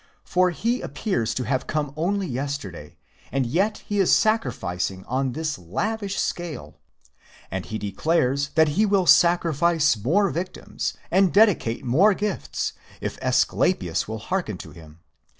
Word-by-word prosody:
For 185 0 +2
he 230 +8 -1
appears 120 - -2
to 130 - -1
have 130 +1 -1
come 150 -3 -2
only 190 +5 0
yesterday, 130 - -5 0.3
and 135 -1 0
yet 190 - 0
he 205 -1 -1
is 190 - +3
sacrific 215 - +2 0.2
_ 90 - 0
ing 95 0 -12
on 130 0 -1
this 155 -4 -3
lavish 200 - -3
scale. 170 -6 -4 0.7
And 95 0 -4
he 110 - -4
declares 140 - 0
that 160 -1 +5
he 165 +9 +2
will 200 -3 +2
sacrifice 170 -3 +4
more 170 - +1
victims, 185 +2 -4 0.2
and 190 0 +4
dedicate 200 - +3
more 185 - +4
gifts, 205 -1 -3 0.3
if - - -5
Asclepius - - +1
will 110 +1 -4
hearken 140 - -3
to - - -10
him. 80 -1 -15
155 Hz, 150 wpm, -24 LUFS, 120-190 Hz, 0.7 s, that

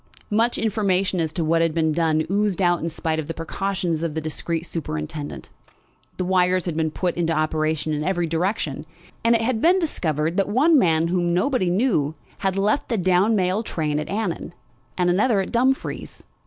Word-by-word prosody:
Much 230 +3 +2
information 195 -4 +1
as 160 -2 0
to 165 +1 -1
what 165 +1 +2
had 165 -1 +1
been 160 -1 +2
done 155 -1 +1
oozed 205 -2 +1
out 175 -2 +2
in 165 - -2
spite 160 0 -2
of 150 - -4
the 165 - -5
precautions 175 0 -2
of 165 -2 -3
the - - 0
discreet 160 +1 -3
superintendent. 145 - -5 0.7
The 185 - -1
wires 185 0 +2
had 170 -3 -2
been 160 0 0
put 175 +3 -2
into 165 -1 +1
operation 155 0 0
in 150 0 -2
every 175 0 0
direction, 165 -3 -2 0.4
and 230 +1 +4
it 225 - +1
had 225 -1 0
been 355 +3 +5
discovered 165 - -1
that 195 0 +1
one 290 +8 +4
man 165 -4 +2
whom 175 -1 +1
nobody 190 0 +1
knew 175 - +1 0.2
had 195 0 -1
left 210 +7 +1
the 230 - 0
down 185 +4 +3
mail 185 +1 +1
train 155 -8 -2
at 150 - -5
Annan, 195 -4 -3 0.4
and 180 -1 +2
another 210 +3 +2
at 190 - -2
Dumfries. 260 +3 -1
175 Hz, 190 wpm, -23 LUFS, 160-200 Hz, 0.7 s, been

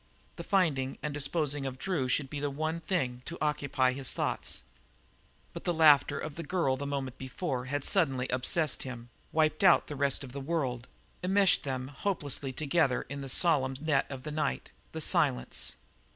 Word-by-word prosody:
The - - -7
finding 150 -9 +1
and 150 - -2
disposing 145 -1 0
of 130 -1 -6
Drew 145 -5 -1
should 135 +2 +1
be 145 +2 -5
the 145 0 -1
one 155 +4 -2
thing 130 -9 -1
to 170 - -6
occupy 140 -4 +1
his 130 0 -2
thoughts, - - -2 0.9
but - - -7
the 175 - 0
laughter 150 -3 +5
of 155 - -5
the 165 - -6
girl 155 -5 0
the 140 +2 -5
moment 135 -2 -4
before 130 -1 -3
had 145 +2 -2
suddenly 135 -9 +2
obsessed 130 +4 +2
him, 120 -2 -7 0.2
wiped 155 +1 +1
out 185 -2 +6
the 150 - -6
rest 140 0 +1
of 130 - -9
the 140 +2 -6
world, 135 -5 -2 0.4
enmeshed 190 -2 +4
them 130 -1 -3
hopelessly 145 -3 -2
together 140 -1 +1
in 140 0 -5
the 135 - -5
solemn 135 -5 +3
net 150 -2 +1
of 135 -2 -7
the 150 - -5
night, 150 - -2 0.2
the - - -5
silence. 60 0 +1
140 Hz, 180 wpm, -30 LUFS, 130-160 Hz, 0.9 s, out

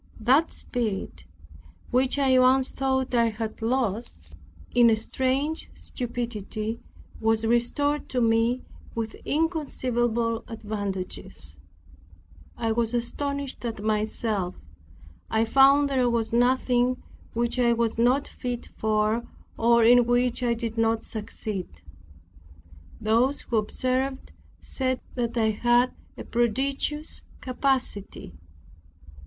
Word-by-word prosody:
That 265 +8 +3
spirit, 195 - -4 0.7
which 255 +2 +2
I 265 -2 +4
once 260 +1 +4
thought 265 -1 -1
I 235 -1 +4
had 220 0 -5
lost 220 - -2 0.4
in 240 -1 +6
a 225 - +5
strange 265 +7 -1
stupidity, 230 -3 -4 0.4
was 225 0 +1
restored 245 +6 +1
to 255 - 0
me 230 +2 +2 0.3
with 225 -1 -3
inconceivable 240 -8 0
advantages. 195 - -4 1.0
I 230 -1 0
was 230 +1 0
astonished 280 +3 -3
at 225 -4 -4
myself. 215 -3 -1 0.7
I 225 0 +2
found 275 +4 +6
there 260 -3 +2
was 230 -1 -1
nothing 250 0 +3 0.4
which 235 +2 -1
I 240 -1 +4
was 230 -1 0
not 250 +4 +3
fit 245 -1 -5
for 215 +1 +1 0.3
or 235 0 +4
in 240 +1 +6
which 245 +1 +2
I 240 -1 +1
did 230 -1 -4
not 225 0 +2
succeed. 210 -3 -5 1.3
Those 230 +6 +2
who 230 - -1
observed 255 +5 -1 0.3
said 260 -1 -2
that 240 -1 -2
I 220 -1 +3
had 240 +3 +3 0.2
a - - -6
prodigious 270 +6 -1 0.2
capacity. 255 - -2
235 Hz, 110 wpm, -26 LUFS, 225-255 Hz, 1.3 s, in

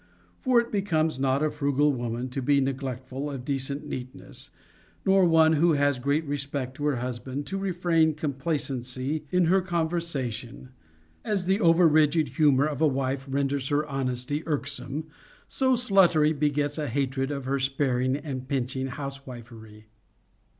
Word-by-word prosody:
For 255 -2 +3
it 235 0 -2
becomes 160 -8 0
not 135 +2 +1
a 155 - +1
frugal 145 0 +1
woman 120 0 -3
to 135 +2 -4
be 140 +2 +3
neglectful 135 0 -3
of 135 -3 -6
decent 140 +1 -2
neatness, 130 -2 -4 0.6
nor 195 -1 +5
one 160 -1 +5
who 165 +2 +4
has 145 -2 +2
great 140 +5 0
respect 140 -2 -3
to 145 - -3
her 145 -2 +2
husband 125 +3 -4
to 195 - -3
refrain 175 -4 +1
complacency 140 -1 -3
in 180 +1 +3
her 185 +3 +3
conversation; 160 - -2
seeing - - -12 0.6
that, - - -8
as 195 -4 0
the 190 +3 +2
over 170 -2 +5
rigid 155 0 +3
humor 145 -3 +3
of 150 -1 -3
a 160 - +5
wife 135 0 -2
renders 140 0 0
her 145 +1 +1
honesty 135 0 -2
irk 150 -3 -1
some, 140 +2 -3 0.4
so 260 -1 +2
sluttery 185 -10 +4
begets 145 0 0
a 150 - -2
hatred 135 +1 -1
of 140 -2 -4
her 135 +1 0
sparing 130 -1 0
and 135 -4 -6
pinch 130 -1 -2
ing 130 0 -2
housewifery. 120 -6 -8
140 Hz, 160 wpm, -26 LUFS, 130-160 Hz, 0.6 s, nor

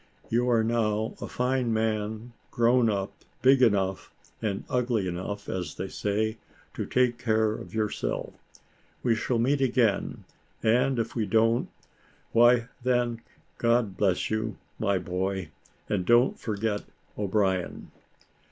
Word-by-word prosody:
You 120 +2 +2
are 115 -2 +3
now 110 -1 0
a - - -4
fine 125 -1 0
man 110 +1 -1 0.2
grown 120 0 +3
up, 100 -2 -2 0.3
big 130 0 +6
enough, 95 -5 +2 0.3
and 100 -3 -2
ugly 120 -6 0
enough, 95 +4 -4
as 90 -5 -4
they 95 - -4
say, 110 +2 -1 0.4
to - - -4
take 125 -2 +2
care 110 -3 +2
of 110 - -8
yourself. 110 -1 -2 0.7
We 120 - +3
shall 115 +2 0
meet 135 +5 +2
again; 120 -5 +1 0.4
and 125 +4 +3
if 115 -1 -2
we 110 -3 0
don't, 115 +3 +2 0.6
why 120 0 +5
then 120 -2 +1 0.4
God 115 -4 +2
bless 95 -1 +1
you, 110 -2 -2 0.2
my 100 -3 +2
boy, 90 0 -2 0.4
and 100 -3 0
don't 120 +6 +4
forget 105 -1 -2 0.3
O'Brien." 95 -3 -1
110 Hz, 130 wpm, -27 LUFS, 100-120 Hz, 0.7 s, big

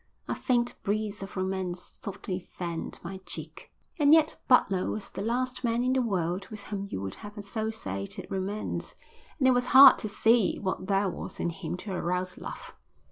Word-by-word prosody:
A - - -1
faint 240 -2 +1
breeze 210 0 -2
of 195 0 -7
romance 185 -1 -3
softly 190 -2 -4
fanned 170 -2 -5
my 190 +2 -5
cheek. - - -5 0.3
And 295 +1 +7
yet 315 -1 +2
Butler 195 -7 +4
was 215 -2 -4
the - - -5
last 250 +4 -1
man 235 0 +1
in 255 +1 +2
the 260 - +3
world 185 -4 -1
with 215 -2 -8
whom 200 -1 -4
you - - -4
would 95 - -4
have 205 +1 -10
associated 205 - -4
romance, 195 +2 -3 0.4
and 265 -4 +3
it - - +7
was 245 0 +2
hard 270 -1 +11
to 215 - -3
see 225 0 +3
what 190 -1 -3
there 200 0 +2
was 180 - -6
in 170 - 0
him 175 0 -5
to 200 +2 -7
arouse 180 0 -2
love. - - -8
200 Hz, 185 wpm, -28 LUFS, 185-230 Hz, 0.4 s, hard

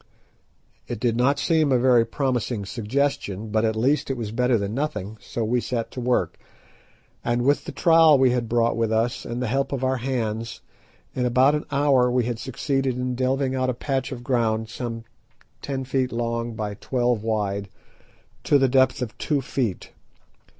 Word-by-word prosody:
It - - -5
did 120 -1 +1
not 130 +4 +2
seem 160 -3 +2
a 130 - +5
very 120 -1 +4
promising 125 -5 -1
suggestion, 110 -2 -2
but 110 +1 +1
at 110 -1 +1
least 135 +8 +1
it 135 - -2
was 110 -3 -4
better 125 +1 +2
than 100 0 -3
nothing, 110 -7 -3
so 115 - -4
we 120 +3 +1
set 115 -2 -3
to 125 - -6
work, 125 0 0 0.8
and, 120 0 0
with 140 +3 +2
the - - -5
trowel 165 -3 +5
we 130 -1 +4
had 120 -2 -1
brought 120 0 +2
with 115 -1 0
us 115 +2 0
and 120 +1 -3
the - - -1
help 135 +4 0
of 135 -2 -3
our 130 0 +1
hands, 115 -3 -3 0.5
in 125 -1 0
about 130 +4 +4
an 150 - -2
hour 140 -3 +3
we 125 -1 +1
succeeded 130 +2 -2
in 125 0 -2
delving 130 +1 0
out 130 -1 0
a 125 - -1
patch 135 +2 -2
of 120 -2 -6
ground 110 -3 0
some 115 -1 -5 0.6
ten 135 -2 -3
feet 130 -1 0
long 115 0 -2
by 105 -1 -3
twelve 120 +1 -1
wide 100 -3 -2 0.8
to 145 - +5
the 135 -1 +3
depth 130 +1 +3
of 115 - -7
two 150 -2 0
feet. 125 -6 -3
125 Hz, 180 wpm, -24 LUFS, 115-135 Hz, 0.8 s, a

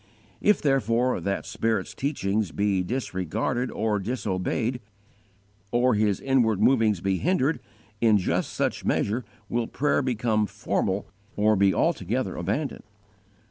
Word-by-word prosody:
_ - - -32 0.4
If, 210 - +3
therefore, 125 - +2
that 100 +3 -2
Spirit's 115 0 -1
teachings 110 - -1
be 100 0 +1
disregarded 120 - -2
or 105 -1 -1
disobeyed, 115 +3 -2 0.9
or 120 +2 +3
His 105 -2 +1
inward 120 -7 +2
movings 110 -5 +3
be 95 0 0
hindered, 165 -4 +1 0.4
in 110 -3 +5
just 95 - -1
such - - -1
measure 115 +5 0 0.2
will 120 -1 -1
prayer 145 +1 +1
become 115 -4 0
formal 95 0 -1 0.3
or 105 +1 +3
be 100 0 +4
altogether 110 -2 0
abandoned. 110 - -2
110 Hz, 125 wpm, -26 LUFS, 100-130 Hz, 0.9 s, in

